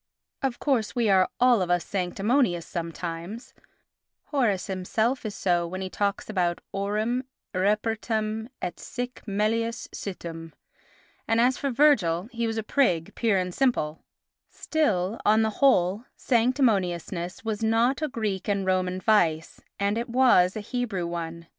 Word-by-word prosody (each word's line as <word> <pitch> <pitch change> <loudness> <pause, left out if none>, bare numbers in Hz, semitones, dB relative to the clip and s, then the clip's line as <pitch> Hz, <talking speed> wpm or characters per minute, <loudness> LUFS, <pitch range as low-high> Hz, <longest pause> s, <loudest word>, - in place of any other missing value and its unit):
Of 265 -4 -1
course, 255 -7 0
we 235 -3 +2
are 190 +1 +4
all 245 -4 +5
of 180 - -1
us 175 -2 +1
sanctimonious 195 - 0
sometimes; 170 +6 -6 0.7
Horace 235 -10 0
himself 220 +6 -1
is 205 - -6
so 175 -2 +1
when 185 +2 -5
he 185 -1 -4
talks 200 -1 -1
about 180 -5 0
aurum 215 +5 -1 0.3
irrepertum 215 +3 -1
et 175 - -4
sic 245 0 -6
melius 225 +3 -1
situm, 165 -4 -7 0.7
and 225 0 +2
as 250 +2 +3
for 280 - -1
Virgil 230 - +3
he 235 -1 -2
was 225 0 -3
a 220 - -1
prig, 180 - +1
pure 225 -4 +1
and 180 -1 -2
simple; 175 - 0 0.5
still, 215 - -1
on 215 +1 +4
the 220 - +1
whole, 210 -5 +3
sanctimoniousness 205 - 0
was 220 -1 -2
not 230 +5 +2
a 310 - +1
Greek 215 -7 -3
and 200 -2 0
Roman 185 0 0
vice 170 -7 +1 0.2
and 200 +3 +1
it 235 - -4
was 235 -8 +4
a 215 - -3
Hebrew 210 -5 -3
one. 170 -1 -5
210 Hz, 145 wpm, -26 LUFS, 180-235 Hz, 0.7 s, all